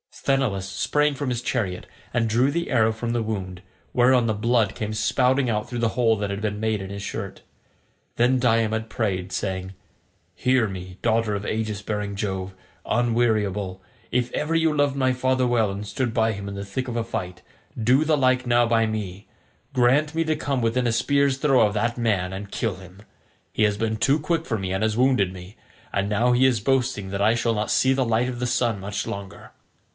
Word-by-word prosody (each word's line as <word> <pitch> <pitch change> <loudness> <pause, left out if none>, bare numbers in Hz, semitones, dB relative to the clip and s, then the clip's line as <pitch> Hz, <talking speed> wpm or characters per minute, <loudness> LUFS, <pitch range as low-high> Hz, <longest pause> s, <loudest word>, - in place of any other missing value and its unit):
Sthenelus 125 -9 0
sprang 145 +10 +1
from 140 -1 -3
his 120 -1 -2
chariot, 100 -9 -2 0.3
and 120 -1 +1
drew 120 +5 +2
the 170 +3 -2
arrow 110 -4 +3
from 115 +1 -4
the 120 0 0
wound, 95 -4 -4 0.3
whereon 125 0 +4
the 110 - +1
blood 110 0 +1
came 110 0 -3
spouting 125 +4 +2
out 105 -1 -1
through 120 - -4
the 115 -1 +2
hole 115 -1 +2
that 100 0 -2
had 100 +1 -4
been 105 -1 -2
made 110 -2 0
in 95 - -6
his 100 0 -6
shirt. - - -6 0.8
Then 125 +2 +3
Diomed 115 -2 +1
prayed, 95 -5 -2
saying, 95 -1 -3 0.6
"Hear 125 -3 +2
me, 95 -1 -8
daughter 115 -2 +1
of 100 0 -4
aegis 110 -2 -2
bearing 105 -1 -3
Jove, 95 -2 -3 0.3
unweariable, 110 -5 0 0.3
if 125 0 0
ever 150 +2 -1
you 160 -2 +2
loved 145 -2 +2
my 130 -2 +2
father 130 0 +1
well 115 -4 +2
and 100 +2 -5
stood 125 0 -2
by 110 -2 +2
him 100 0 -6
in 100 - -5
the 100 0 -5
thick 115 +7 -4
of 120 - -4
a 115 - 0
fight, 90 -6 -5 0.4
do 130 +6 +4
the 155 -1 +2
like 130 -1 +2
now 120 0 +4
by 115 -1 +2
me; 105 -3 -5 0.5
grant 135 +5 +3
me 165 - +2
to 155 0 +1
come 140 -3 -2
within 120 +2 +1
a - - +2
spear's 140 +3 +2
throw 135 -5 +4
of 105 - -1
that 115 +3 0
man 100 -6 0
and 100 +1 -7
kill 110 -5 -1
him. 95 +2 -14 0.5
He 110 - +1
has 105 -1 +2
been 110 0 -1
too 140 +7 +2
quick 165 +2 -1
for 115 - -1
me 95 -2 -3
and 95 +3 -1
has 110 0 0
wounded 125 -7 +3
me; 95 +2 -11 0.4
and 100 0 0
now 115 +4 +2
he 125 +2 +4
is 125 -4 +3
boasting 125 -4 0
that 100 +1 -3
I 110 +2 +4
shall 115 0 +1
not 105 0 -2
see 130 0 +3
the 130 -1 +1
light 115 +2 +1
of 120 -1 -5
the 125 - -1
sun 120 -4 0
much 100 +2 -4
longer." 100 -1 -7
115 Hz, 210 wpm, -24 LUFS, 100-125 Hz, 0.8 s, whereon